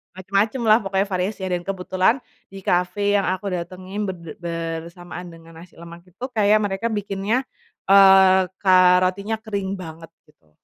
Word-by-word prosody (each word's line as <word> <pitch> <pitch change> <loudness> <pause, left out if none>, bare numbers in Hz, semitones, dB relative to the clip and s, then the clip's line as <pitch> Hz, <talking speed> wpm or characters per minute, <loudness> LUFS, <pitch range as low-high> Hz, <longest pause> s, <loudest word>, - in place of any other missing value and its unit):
macem-macemlah 215 +4 +2
pokoknya 195 +1 -1
variasinya 190 +1 -2
dan 175 - -5
kebetulan, 185 +2 +1 0.4
di 195 - -9
cafe 180 +3 +1
yang 200 - +2
aku 185 +2 -3
datengin 185 +3 -6
berde 170 -4 -8 0.5
bersamaan 175 +1 -10
dengan 165 0 -15
nasi 180 - -19
lemak 170 0 -11
itu 190 +7 -14
kayak 210 0 +4
mereka 200 +3 -2
bikinnya, 200 +3 -2 0.5
eee, 190 -1 +7 0.2
ka 190 - +2 0.3
rotinya 200 +4 -2
kering 200 -3 -4
banget 165 -1 -10 0.2
gitu. 80 - -29
190 Hz, 140 wpm, -22 LUFS, 180-200 Hz, 0.5 s, eee